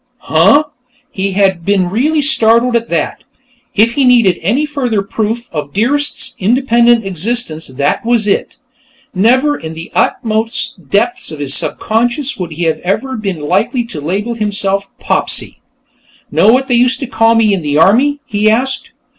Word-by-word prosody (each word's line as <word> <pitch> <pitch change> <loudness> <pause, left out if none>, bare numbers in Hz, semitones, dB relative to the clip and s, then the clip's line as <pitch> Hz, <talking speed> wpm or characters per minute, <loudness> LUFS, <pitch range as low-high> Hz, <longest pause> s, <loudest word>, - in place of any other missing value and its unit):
"Huh?" 205 - +3 0.5
He 195 0 -3
had 190 -3 +1
been 190 -2 0
really 295 +8 +1
startled 235 -3 +3
at 230 0 -1
that. - - -2 0.5
If 225 +3 +4
he 275 - +1
needed 235 -8 +3
any 240 - 0
further 250 -9 -2
proof 225 +3 -3
of 150 -3 -5
Dearest's 260 +3 0
independent 235 +1 +2
existence, 190 -2 -2
that 140 +2 -2
was 235 -2 +2
it. 205 - -1 0.6
Never, 255 +9 +2
in 160 - -8
the 165 +1 -9
uttermost 220 - -1
depths 235 +4 0
of 155 - -7
his 140 -2 -1
subconscious, 240 - 0
would 175 -4 -5
he 170 +3 -4
have 160 -1 -1 0.4
been 190 -7 -4
likely 200 - 0
to 200 -11 -8
label 200 +10 -2
himself 200 -3 -1
Popsy. - - -2 0.7
"Know 220 - +4
what 265 +2 +1
they 250 - 0
used 250 +2 +2
to - - -2
call 225 -2 +2
me 220 -2 +3
in 190 - -1
the 145 -1 -1
Army?" 265 - +3
he 210 +1 +1
asked. 255 +5 -1
220 Hz, 155 wpm, -13 LUFS, 190-245 Hz, 0.7 s, If